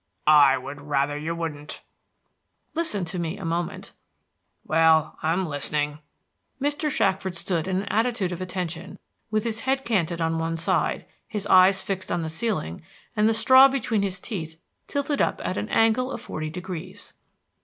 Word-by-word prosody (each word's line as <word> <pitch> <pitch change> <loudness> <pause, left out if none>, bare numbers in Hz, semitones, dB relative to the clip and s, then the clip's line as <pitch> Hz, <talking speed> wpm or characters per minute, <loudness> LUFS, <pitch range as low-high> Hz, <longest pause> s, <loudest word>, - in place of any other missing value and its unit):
"I 145 -3 +7
would 145 0 -8
rather 145 0 0
you 160 +3 -3
wouldn't." 155 -3 -5 0.9
"Listen 320 - -1
to 175 +2 -4
me 170 +3 -3
a 195 - -7
moment." 170 +1 -3 0.7
"Well, 160 -1 +3
I'm 170 +4 +1
listening." 150 0 -2 0.6
Mr. 290 +2 0
Shackford 190 -7 0
stood 170 -1 -1
in 190 0 0
an - - -10
attitude 225 -4 0
of 180 0 -5
attention, 180 -2 -4 0.3
with 215 -1 0
his 225 -1 -2
head 265 +3 -1
canted 175 -7 0
on 165 0 0
one 165 0 -1
side, 165 - 0 0.2
his 210 -1 -4
eyes 190 0 +6
fixed 190 -2 -3
on 175 -1 0
the 160 - -4
ceiling, 165 - -2 0.3
and 215 0 +4
the - - +3
straw 260 +4 +8
between 240 -6 0
his 195 -1 -2
teeth 160 -7 -6 0.3
tilted 285 0 -1
up - - +1
at - - -1
an - - -3
angle 225 +3 +3
of - - -4
forty 155 0 -5
degrees. 180 +1 -7
180 Hz, 165 wpm, -25 LUFS, 160-215 Hz, 0.9 s, straw